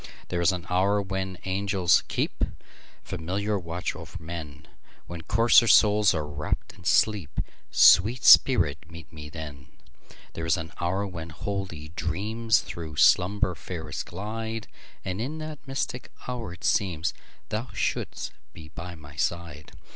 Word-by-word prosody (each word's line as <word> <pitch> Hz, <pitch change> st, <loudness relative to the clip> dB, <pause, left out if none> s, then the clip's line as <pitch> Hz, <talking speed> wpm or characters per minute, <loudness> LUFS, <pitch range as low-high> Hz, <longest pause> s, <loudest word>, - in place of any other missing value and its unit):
There 90 Hz, -1 st, -1 dB
is 85 Hz, -, +4 dB
an 90 Hz, -1 st, -4 dB
hour 95 Hz, +3 st, +2 dB
when 95 Hz, -1 st, -3 dB
angels 95 Hz, -1 st, +2 dB
keepFamiliar 100 Hz, +5 st, -4 dB
watch 85 Hz, +1 st, -3 dB
o'er -, -, -9 dB
men, 80 Hz, -2 st, -8 dB, 0.4 s
When 85 Hz, -1 st, -7 dB
coarser 115 Hz, +5 st, +5 dB
souls 105 Hz, -2 st, +5 dB
are 75 Hz, -1 st, -1 dB
wrapp'd 75 Hz, 0 st, -4 dB
in 90 Hz, 0 st, -17 dB
sleep—Sweet 105 Hz, -, +3 dB
spirit, 80 Hz, -, +6 dB
meet 85 Hz, -1 st, -12 dB
me 75 Hz, -1 st, -9 dB
then! 75 Hz, -3 st, -8 dB, 0.7 s
There 80 Hz, 0 st, -4 dB
is 80 Hz, -, +3 dB
an 80 Hz, -1 st, -6 dB
hour 95 Hz, +4 st, 0 dB
when 85 Hz, -4 st, -7 dB
holy 85 Hz, -2 st, -5 dB
dreamsThrough 85 Hz, -2 st, -1 dB
slumber 90 Hz, +5 st, +4 dB
fairest 85 Hz, -1 st, -6 dB
glide; 110 Hz, +4 st, -5 dB, 0.4 s
And 95 Hz, +2 st, -3 dB
in 145 Hz, +7 st, -3 dB
that 155 Hz, -1 st, -6 dB
mystic 135 Hz, -2 st, -3 dB, 0.2 s
hour 120 Hz, -7 st, -4 dB
it 90 Hz, -, -12 dB
seemsThou 100 Hz, +6 st, -2 dB
shouldst -, -, -2 dB, 0.2 s
be 80 Hz, -1 st, -12 dB
by 85 Hz, +2 st, -8 dB
my 75 Hz, -3 st, -13 dB
side. 75 Hz, -2 st, -3 dB
90 Hz, 130 wpm, -27 LUFS, 80-105 Hz, 0.7 s, spirit